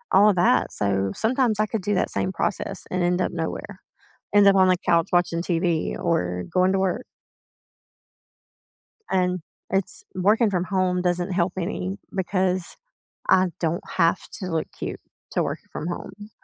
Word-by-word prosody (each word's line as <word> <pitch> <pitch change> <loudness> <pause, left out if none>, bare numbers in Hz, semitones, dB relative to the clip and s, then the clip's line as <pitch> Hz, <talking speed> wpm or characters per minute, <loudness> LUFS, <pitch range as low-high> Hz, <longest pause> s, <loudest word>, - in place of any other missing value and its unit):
all 205 +2 +7
of 205 - +2
that, 175 -8 +3
so 100 -1 0
sometimes 230 -2 +1
I 215 - +4
could 215 0 -3
do 205 +2 0
that 185 - 0
same 185 - -1
process 195 - -2
and 185 - 0
end 175 +1 +2
up - - 0
nowhere. 165 -2 -5 0.5
End 205 -1 +6
up 195 - +6
on 190 -1 +6
the 185 -1 +4
couch 170 -2 +3
watching 175 -1 +2
TV 170 -2 0
or 90 - 0
going 185 +1 +4
to - - +2
work 190 +6 -1 2.0
and 180 -1 +1 0.3
it's 195 -1 -2
working 210 +5 +3
from 180 -3 0
home 185 -1 +1
doesn't 180 +1 0
help 180 0 +1
any 95 - -3 0.2
because 185 -1 0 0.5
I 185 0 +5
don't 165 0 -1
have 165 -2 +2 0.2
to 185 - -4
look 165 -3 -1
cute - - -5 0.3
to - - +1
work - - -3
from 155 - -4
home. 205 +4 -7
180 Hz, 165 wpm, -24 LUFS, 170-195 Hz, 2.0 s, all